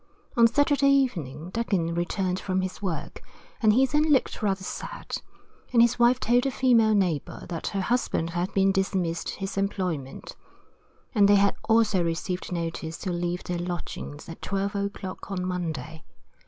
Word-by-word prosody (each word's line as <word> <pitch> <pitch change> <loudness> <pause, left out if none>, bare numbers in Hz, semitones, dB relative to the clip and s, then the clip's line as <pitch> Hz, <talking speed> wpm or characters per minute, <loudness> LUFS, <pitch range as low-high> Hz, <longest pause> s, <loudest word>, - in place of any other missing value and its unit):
On 235 -1 +7
Saturday 285 +2 +3
evening 175 - 0
Duggin 190 -7 0
returned 180 +2 -1
from 185 -1 -1
his 185 +2 -5
work, 165 -6 -4 0.4
and 215 -2 +5
he 255 +5 +5
then 300 +3 +2
looked 270 -3 +2
rather 195 -2 0
sad, - - -5 0.5
and 245 - +3
his 235 +1 +4
wife 240 +1 +5
told 245 +3 +2
a - - +2
female 235 -5 +4
neighbour 175 -8 -1
that 165 -3 -4
her 195 - -1
husband 190 -7 0
had 175 +2 -2
been 195 0 +4
dismissed 190 -3 -1
his 195 0 -5
employment, 180 -9 -3 0.8
and 205 -4 +5
they 205 - +6
had 200 0 +4
also 215 -5 +4
received 170 +3 -3
notice 165 -1 -3
to 185 - -4
leave 175 0 -2
their 175 -1 -3
lodgings 175 -4 -5
at 165 - -9
12 195 0 -2
o'clock 200 -2 -4
on 185 -2 -2
Monday. 160 -4 -4
190 Hz, 160 wpm, -26 LUFS, 175-225 Hz, 0.8 s, On